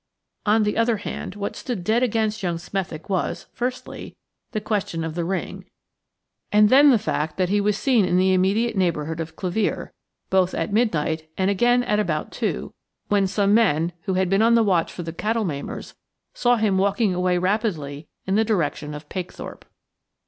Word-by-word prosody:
On 215 +1 +4
the 210 +1 -1
other 230 -1 +2
hand, 195 -1 -6
what 200 0 -4
stood 235 -8 -4
dead 220 +6 +2
against 220 -3 0
young 175 -3 -1
Smethick 175 -2 -5
was, 190 -3 -2
firstly, 250 +1 -5 0.4
the 215 - -1
question 205 -6 -2
of 160 -1 -4
the 170 +1 -2
ring, 190 +3 -4 0.9
and 210 0 +5
then 285 +4 +7
the 250 - +6
fact 155 -6 -2
that 185 -1 +1
he 205 +1 +2
was 205 0 +1
seen 245 -5 +3
in 180 -1 +2
the 190 +1 +3
immediate 205 +5 +2
neighbourhood 165 -4 -1
of 160 0 -5
Clevere, 190 +4 -2 0.4
both 190 -1 +2
at 200 - -2
midnight 160 -8 0
and 190 +1 +2
again 245 +5 +3
at 210 -3 +1
about 155 -7 -1
two, 65 - -3 0.4
when 200 -2 +3
some 200 +1 +2
men, 175 -7 +3
who 190 -2 0
had 185 0 +2
been 195 +3 +2
on 230 +1 +5
the 230 - +5
watch 180 -6 +1
for 175 - -6
the 165 0 -6
cattle 220 +5 -1
maimers, 145 -5 -5 0.4
saw 245 0 +3
him 210 -4 +1
walking 200 +1 +2
away 180 0 +1
rapidly 175 -7 -1 0.2
in 190 - -1
the 220 +2 +4
direction 155 -8 -1
of 150 0 -9
Pakethorpe. 180 +1 -7
195 Hz, 185 wpm, -23 LUFS, 175-215 Hz, 0.9 s, then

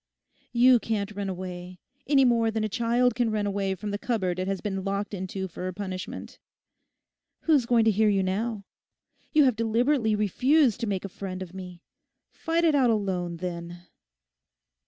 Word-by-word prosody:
You 250 0 +6
can't 215 -2 -2
run 200 -1 -4
away, 180 -1 -6 0.3
any 275 -2 +5
more 230 -2 +3
than 220 0 -1
a - - +1
child 240 +3 +1
can 240 0 +1
run 215 -1 -1
away 195 -1 -1
from 205 +3 -5
the 205 - -3
cupboard 185 -8 -1
it 185 - -2
has 195 -1 -1
been 195 -2 -3
locked 200 +1 -2
into 190 0 -4
for 180 +1 -6
a 185 - -4
punishment. 185 -1 -6 1.0
Who's 290 -7 +3
going 235 -2 +4
to 220 - +5
hear 215 +1 +3
you 195 -2 +2
now? 205 +3 -2 0.7
You 305 -2 +5
have 255 -4 +3
deliberately 230 +1 +1
refused 250 - +2
to 235 - -2
make 195 -2 -2
a - - -2
friend 190 -1 -6
of 180 -1 -12
me. 180 -2 -9 0.5
Fight 330 +1 -1
it 325 -2 +4
out 265 -4 +4
alone, 185 -6 -1
then! 175 0 -6
205 Hz, 175 wpm, -27 LUFS, 185-235 Hz, 1.0 s, You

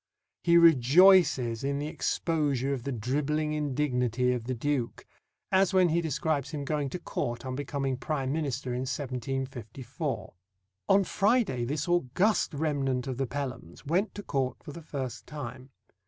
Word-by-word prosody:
He 170 0 +5
rejoices 150 -5 +5
in 140 0 0
the 145 - -3
exposure 150 -4 0
of 125 -3 -5
the 140 - -2
dribbling 150 +6 -1
indignity 125 -4 0
of 120 -2 -4
the 130 +1 -2
Duke, 130 -1 -2 0.5
as 190 0 +3
when 185 -2 +5
he 170 +2 +2
describes 150 -2 -1
him 145 -2 -5
going 145 -1 -1
to 180 - -4
Court 120 -7 -4
on 130 - -3
becoming 135 -1 -2
Prime 135 0 -2
Minister 135 -5 -2
in 125 - -2
1754: 130 - -4 0.6
On 195 0 +5
Friday 200 - +1
this 145 +3 -2
august 175 - +1
remnant 140 -4 0
of 130 -3 -4
the 135 -1 -1
Pelhams 130 - -6
went 180 +8 0
to 205 - -6
Court 130 -6 -1
for - - -8
the 170 - -9
first 135 -6 -6
time. 130 -3 -7
140 Hz, 155 wpm, -29 LUFS, 130-155 Hz, 0.6 s, He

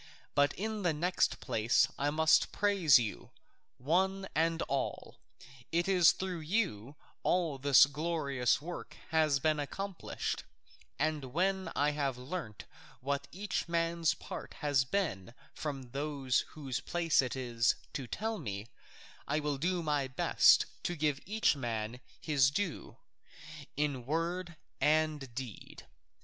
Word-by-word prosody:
But 145 0 +3
in 215 +1 -3
the 175 -4 +1
next 175 +4 +1
place 110 +2 +2
I 145 +1 0
must 160 +1 +4
praise 195 -8 +5
you, 115 -4 -3 0.5
one 190 +8 +1
and 165 +1 +1
all; 140 0 -3 0.5
it 170 +2 +1
is 180 -4 +6
through 185 -2 -4
you 155 - -1 0.3
all 165 -6 +1
that 140 - -6
this 135 - +9
glorious 140 -4 0
work 175 +4 -8
has 155 -3 +3
been 155 +2 +1
accomplished, 195 +6 -4 0.5
and 155 -3 0
when 190 +8 0
I 145 +1 +2
have 140 -4 -1
learnt 125 - -6 0.3
what 140 +2 -2
each 200 0 -3
man's 170 -1 +1
part - - -8
has 145 -5 +1
been 125 - -2 0.2
from 135 -5 -5
those 140 -2 0
whose 135 -5 -4
place 170 -3 +2
it 130 -1 -3
is 120 -3 +1 0.2
to 135 -3 -4
tell 220 - -3
me, 105 -6 -5 0.6
I 150 +2 +1
will 145 -2 -2
do 175 +2 0
my 145 -3 0
best 130 - +5 0.2
to 175 - -2
give 150 -3 0
each 215 -5 +2
man 115 -2 -3 0.2
his 140 -5 +3
due, 180 +2 -3 0.8
in 140 -5 -1
word 170 +3 -2 0.2
and 155 -3 +1
deed. 125 -5 -8
150 Hz, 135 wpm, -32 LUFS, 135-175 Hz, 0.8 s, this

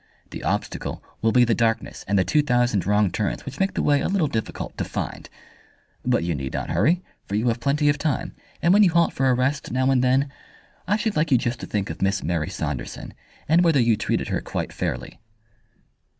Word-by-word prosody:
The - - -7
obstacle - - -3 0.2
will 115 - +3
be 125 +1 +5
the 115 - +2
darkness 115 -1 -1
and 100 +1 +2
the 95 - +4
two 150 - +2
thousand 120 - +1
wrong 105 -2 +3
turns 105 +1 -2
which 140 +1 -8
make 195 0 0
the - - 0
way 145 -1 +3
a - - 0
little 190 -5 +1
difficult 110 -5 -4
to - - +1
find. - - -5 0.7
But 125 -7 +1
you 85 0 0
need 70 -3 -4
not - - -3
hurry, 145 - +2 0.2
for 100 - -3
you 115 +3 +2
have 115 +1 -1
plenty 140 +4 +1
of 145 0 +2
time, 145 -3 -1 0.3
and 170 - +5
when 205 - +6
you 195 - +6
halt 170 -1 +3
for 135 0 +1
a 125 - +4
rest 135 +3 -1
now 130 +2 +2
and 130 -2 +3
then, 135 +2 +2 0.6
I 205 +3 +2
should 220 -2 -1
like 155 0 +1
you 130 - +6
just 120 0 -2
to - - -7
think 100 -1 -2
of - - -9
Miss 100 +1 +1
Mary 80 -2 -1
Saunderson, 70 -5 -5 0.3
and 165 +3 +4
whether 165 -5 +4
you 115 -2 +4
treated - - -1
her - - -1
quite - - -4
fairly." - - -4
125 Hz, 220 wpm, -24 LUFS, 105-150 Hz, 0.7 s, when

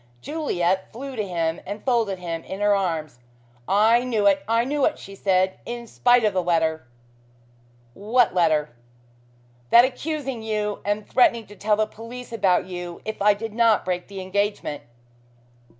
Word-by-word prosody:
Juliet 190 - -1
flew 265 +3 -7
to 215 - -1
him 165 -2 -2
and 205 +1 -7
folded 230 -7 +1
him 170 -2 -5
in 190 - -7
her 205 0 +3
arms. 160 -9 -2 0.5
"I 220 +5 +4
knew 225 -5 0
it 195 -1 +4
I 230 +1 +2
knew 285 +1 -1
it," 310 - 0
she 195 - -11
said, 190 -1 +1
"in 240 0 -6
spite 245 +1 +3
of 210 -2 +2
the 185 - +1
letter 160 -4 0 0.6
" 120 0 -33 0.2
"What 250 -2 +5
letter?" 155 -5 +2 1.0
"That 235 +1 +8
accusing 270 -2 -4
you 210 -1 -2
and 205 +1 -2
threatening 235 -3 +3
to 205 - -14
tell 210 +1 +1
the 215 +1 +1
police 235 +4 -10
about 195 -5 +2
you 175 -1 -7
if 220 -2 -5
I 205 0 +5
did 225 +1 -6
not 225 -2 +3
break 180 -1 -2
the 195 -1 -7
engagement." 200 -5 -2
205 Hz, 165 wpm, -23 LUFS, 180-230 Hz, 1.0 s, That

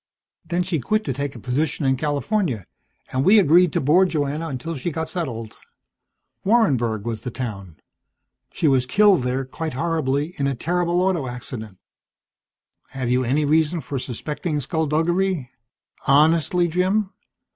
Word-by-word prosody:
Then 175 0 -1
she 175 -3 -1
quit 215 - 0
to 135 - -2
take 140 +1 -4
a - - -8
position 140 +5 -1
in 130 0 +3
California, 145 - -1 0.5
and 130 +1 0
we 200 +7 +6
agreed 175 -2 +5
to - - +1
board 175 +7 +4
Joanna 150 +1 -2
until 160 +3 -4
she 145 +3 -3
got 160 0 -4
settled. 120 -11 -4 0.9
Warrenburg 125 - +2
was 115 -2 -3
the 125 - -4
town. 100 -9 -6 0.8
She 160 - 0
was 130 -3 +3
killed 200 +3 +5
there 125 +2 -1
quite 155 +4 -5
horribly, 150 +1 -1
in 140 - +1
a 135 - -1
terrible 175 +5 0
auto 180 -7 0
accident." 115 -4 -7 1.1
"Have 130 -3 -3
you 125 +1 +2
any 140 +5 +1
reason 160 +3 +2
for 140 -1 -4
suspecting 150 +5 -3
skulduggery? 160 +1 0 0.6
Honestly, 160 +4 +4
Jim? 185 +4 0
150 Hz, 145 wpm, -22 LUFS, 130-175 Hz, 1.1 s, we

